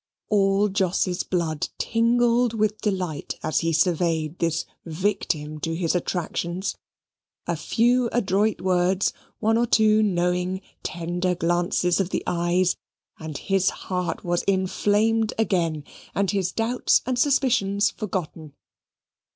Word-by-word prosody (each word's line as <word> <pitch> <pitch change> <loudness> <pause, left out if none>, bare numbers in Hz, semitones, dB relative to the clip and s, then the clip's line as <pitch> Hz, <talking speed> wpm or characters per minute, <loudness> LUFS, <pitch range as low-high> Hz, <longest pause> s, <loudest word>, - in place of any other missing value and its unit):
All 200 0 +3
Jos's 190 -2 0
blood 165 -4 -2
tingled 235 0 +2
with 215 0 0
delight, 185 -8 -2
as 155 0 +1
he 165 0 0
surveyed 165 -1 +1
this 165 -1 0 0.2
victim 160 -3 -2
to 165 +2 -2
his 165 -1 0
attractions. 180 +1 -2 0.7
A - - -1
few 245 +1 +2
adroit 210 -2 +1
words, 185 +1 +1 0.2
one 225 +1 +2
or 240 - +2
two 215 -1 +4
knowing 180 -1 0 0.2
tender 175 +2 -2
glances 175 +1 +1
of 190 -2 0
the - - -2
eyes, 175 +1 +1 0.4
and 155 -2 -6
his 195 -1 +1
heart 180 -2 -4
was 175 0 0
inflamed 205 +3 +1
again 170 -8 0 0.3
and 200 -1 +1
his 190 -3 0
doubts 235 +2 +1
and 250 0 -1
suspicions 245 -8 +2
forgotten. 170 -7 -5
185 Hz, 120 wpm, -24 LUFS, 175-215 Hz, 0.7 s, two